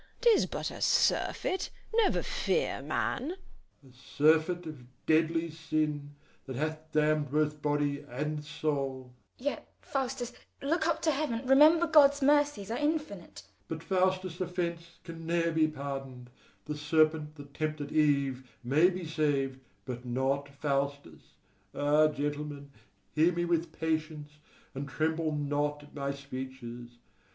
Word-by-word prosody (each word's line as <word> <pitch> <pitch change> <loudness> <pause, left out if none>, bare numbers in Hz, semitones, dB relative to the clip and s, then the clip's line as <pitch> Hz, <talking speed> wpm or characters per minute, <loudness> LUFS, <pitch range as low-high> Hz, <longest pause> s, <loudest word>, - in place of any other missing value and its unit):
'Tis 470 -3 +5
but - - -3
a - - -9
surfeit; 380 - +2 0.2
never 445 -3 +3
fear, 475 - 0
man. 300 +9 -2 0.5
FAUSTUS. 130 -2 -19
A - - -16
surfeit 160 +4 +3
of 130 -5 -11
deadly 165 +1 +2
sin, 155 -2 -2 0.3
that 130 - -5
hath 155 +3 -3
damned 150 -1 +2
both 150 +1 0
body 145 -1 0
and 150 +4 -3
soul. 140 -4 -3 0.2
SECOND 250 - -14
SCHOLAR. 285 - 0
Yet, - - -24
Faustus, 260 -3 -3 0.3
look 315 +3 +1
up 335 -1 0
to 320 - +4
heaven; 270 -4 -2
remember 305 +6 +6
God's 285 -3 +6
mercies 285 -7 +3
are 235 - -1
infinite. 295 - -2
FAUSTUS. - - -31
But 160 0 -5
Faustus' 185 -1 0
offence 170 -1 -3
can 165 -2 -8
ne'er 170 0 +1
be 160 -1 +3
pardoned: 135 -4 -6 0.3
the 150 - -4
serpent 155 0 +2
that 145 -2 -12
tempted 155 -1 -3
Eve 140 -4 +1
may 150 +8 +4
be 185 -1 -5
saved, 145 -4 0 0.3
but 125 -1 -5
not 135 +3 -1
Faustus. 140 0 -3 0.4
Ah, 150 +2 +4
gentlemen, 145 -1 -4 0.4
hear 160 +3 +4
me 175 0 -1
with 170 -1 0
patience, 155 -2 -3 0.3
and 140 +1 -5
tremble 160 +2 0
not 145 0 -1
at 145 - -17
my 140 -1 -2
speeches! 130 -3 -8
155 Hz, 140 wpm, -30 LUFS, 140-175 Hz, 0.5 s, remember